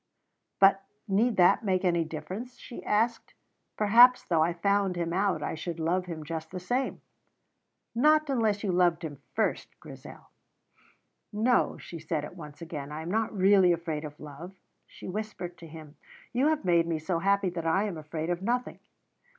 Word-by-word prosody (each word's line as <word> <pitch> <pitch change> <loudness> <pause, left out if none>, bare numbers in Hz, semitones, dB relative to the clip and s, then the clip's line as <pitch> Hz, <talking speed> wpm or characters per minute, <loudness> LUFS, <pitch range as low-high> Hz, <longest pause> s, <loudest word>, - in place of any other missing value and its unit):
"But 195 0 +6 0.3
need 215 +3 +2
that 185 +4 +5
make 190 -2 0
any 170 -2 +2
difference?" 180 +11 -7
she 240 - -10
asked. 225 +2 0 0.4
"Perhaps 240 +4 +6
though 165 -3 +2
I 165 +2 +3
found 200 +2 +1
him 170 -1 -2
out 185 -5 0
I - - -2
should 165 +1 -5
love 180 +3 0
him 160 -3 -6
just 160 +1 -5
the 185 - -6
same." 245 +9 -2 0.9
"Not 305 +5 +4
unless 225 -6 0
you 200 - 0
loved 175 -1 +2
him 145 -3 -7
first, - - -2
Grizel." - - -12 1.0
"No," 225 +4 +2
she 170 - -9
said 155 -1 -3
at 165 - -11
once 150 -1 -10
again. 150 -3 -6
"I 155 +1 -5
am 170 - -5
not 220 +1 0
really 190 -1 +5
afraid 165 -3 -2
of 150 -1 -9
love," 150 +6 -10 0.3
she - - -11
whispered 190 -3 -5
to 165 - -10
him. 155 -1 -12 0.4
"You 255 +4 +2
have 310 -8 0
made 170 -2 +3
me 165 -1 -1
so 165 +2 -2
happy 200 0 +1
that 170 -1 -4
I 190 +5 +2
am 195 -7 -4
afraid 155 +2 -4
of 175 +1 -2
nothing." 245 +5 -2
180 Hz, 175 wpm, -28 LUFS, 160-205 Hz, 1.0 s, But